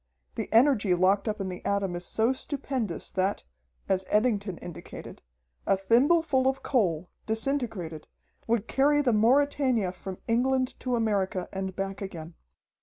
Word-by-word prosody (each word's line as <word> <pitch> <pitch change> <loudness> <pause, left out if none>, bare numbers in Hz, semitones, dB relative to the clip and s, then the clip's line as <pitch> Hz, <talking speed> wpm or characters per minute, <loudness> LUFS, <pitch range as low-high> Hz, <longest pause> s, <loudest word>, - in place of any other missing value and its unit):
The - - -5
energy 225 -6 +4
locked 190 +4 +2
up 215 0 -2
in 195 - -2
the 180 - -7
atom 200 -3 0
is 175 0 -4
so 225 +4 +2
stupendous 260 - -3
that, 190 +1 -1 0.4
as 190 0 +1
Eddington 210 -4 +1
indicated, 175 - -9 0.5
a 195 - +4
thimbleful 265 - +3
of 265 0 0
coal, 180 - 0 0.2
disintegrated, 220 - -2 0.4
would 230 -1 0
carry 290 +2 +3
the 245 -4 +2
Mauretania 250 -2 +3
from 185 0 -8
England 255 +2 +1
to 250 -1 -1
America 200 -5 0
and 190 -1 -4
back 195 0 -4
again. 170 -4 -7
215 Hz, 140 wpm, -28 LUFS, 190-255 Hz, 0.5 s, energy